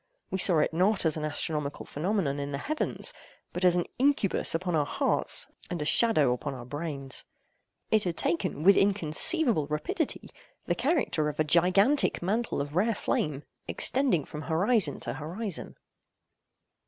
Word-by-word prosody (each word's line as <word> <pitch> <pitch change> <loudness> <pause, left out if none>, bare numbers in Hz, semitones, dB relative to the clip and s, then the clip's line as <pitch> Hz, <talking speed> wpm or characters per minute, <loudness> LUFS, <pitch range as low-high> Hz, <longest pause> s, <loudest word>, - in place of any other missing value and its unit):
We 190 - -2
saw 180 -2 +4
it 155 - +1
not 190 +3 +2
as 160 - +2
an 155 - -4
astronomical 150 -1 -3
phenomenon 155 -3 -2
in 140 0 -4
the 140 - -3
heavens, 305 - -3 0.4
but 180 - -2
as 180 -1 +5
an 175 - 0
incubus 265 -11 +2
upon 180 +1 -2
our 150 - +2
hearts, - - +1 0.2
and 175 - -4
a 150 - -3
shadow 155 - +4
upon 135 +2 -5
our 120 -2 -9
brains. 140 -1 -3 0.7
It 215 -2 +3
had 170 -2 -3
taken, 160 -3 -2
with 200 +2 +6
inconceivable 200 - +3
rapidity, 155 - -3 0.3
the - - 0
character 265 - 0
of 150 - -8
a - - +4
gigantic 185 - +3
mantle 220 -1 -1
of 145 +2 -6
rare 215 +5 +1
flame, 150 -6 -2 0.2
extending 250 - +2
from 150 - -8
horizon 190 +8 +2
to - - -3
horizon. 180 +5 -5
170 Hz, 155 wpm, -28 LUFS, 150-205 Hz, 0.7 s, with